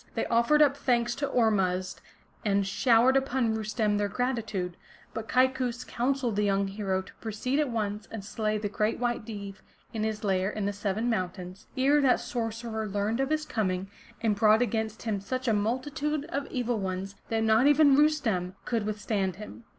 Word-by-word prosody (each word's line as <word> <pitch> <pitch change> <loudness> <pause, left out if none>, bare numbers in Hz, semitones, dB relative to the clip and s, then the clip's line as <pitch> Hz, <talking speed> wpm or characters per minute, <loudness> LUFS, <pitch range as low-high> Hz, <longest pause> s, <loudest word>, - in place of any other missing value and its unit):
They - - 0
offered 235 +6 +4
up 280 -1 +3
thanks 240 -4 +1
to 280 0 -1
Ormuzd 190 -7 +1 0.4
and 200 -1 +2
showered 235 +5 +4
upon 260 -4 +1
Rustem 215 -1 0
their 205 - +1
gratitude. 215 -7 -2 0.4
But 225 0 -5
Kaikous 255 -1 +1
counseled 245 -3 -1
the 210 - +2
young 200 -1 +1
hero 195 -2 -2
to - - -15
proceed 230 +6 -1
at 295 -3 +1
once 210 -2 -3
and 215 -3 -7
slay 215 +1 -1
the 210 0 -2
Great 210 +2 0
White 240 -2 -1
Deev 200 -3 -7 0.4
in 220 -2 -2
his 220 0 -2
lair 190 -1 +1
in 210 -1 -3
the 205 - -1
Seven 205 +3 -2
Mountains, 185 -3 -3
ere 280 +3 +4
that 265 -3 +4
sorcerer 225 -2 -3
learned 205 +3 -1
of 270 0 +1
his 310 0 0
coming 195 -6 -2 0.3
and 220 -2 +2
brought 215 +2 +5
against 220 -1 -2
him 215 -4 -2
such 255 +5 -3
a 225 - +3
multitude 280 +8 -1
of 280 -4 -3
Evil 245 -3 -1
ones, 190 0 -3 0.2
that 225 -1 +1
not 220 +4 +4
even 290 -1 +6
Rustem 250 -12 +2
could 225 -3 -1
with 215 0 -3
stand 195 -4 -1
him. 210 +3 -10
220 Hz, 180 wpm, -28 LUFS, 205-250 Hz, 0.4 s, even